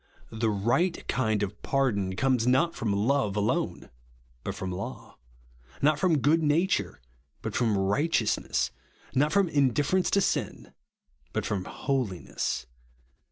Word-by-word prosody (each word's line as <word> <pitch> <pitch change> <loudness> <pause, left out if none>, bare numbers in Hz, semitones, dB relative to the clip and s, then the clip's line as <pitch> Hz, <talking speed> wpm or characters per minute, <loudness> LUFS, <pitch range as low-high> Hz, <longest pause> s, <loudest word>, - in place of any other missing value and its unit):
The 110 0 0
right 120 - 0
kind 110 -4 +1
of 100 +1 -5
pardon 100 -9 0
comes 130 0 +1
not 165 +7 +3
from 110 -2 -2
love 105 +1 +1
alone, 105 - -1 0.5
but - - -4
from 95 -1 -4
laiu; 90 +2 -6 0.7
not 150 +1 +3
from 175 -4 +3
good 150 +4 +3
nature, 160 +5 +1 0.4
but - - -4
from 115 -5 +2
righteousness; 110 +5 +1 0.4
not 145 +3 +2
from 200 +1 +3
indifference 145 +4 +2
to 200 - +3
sin, - - -2 0.6
but - - -1
from 95 -3 -2
holiness. 125 -10 -2
130 Hz, 125 wpm, -28 LUFS, 105-150 Hz, 0.7 s, not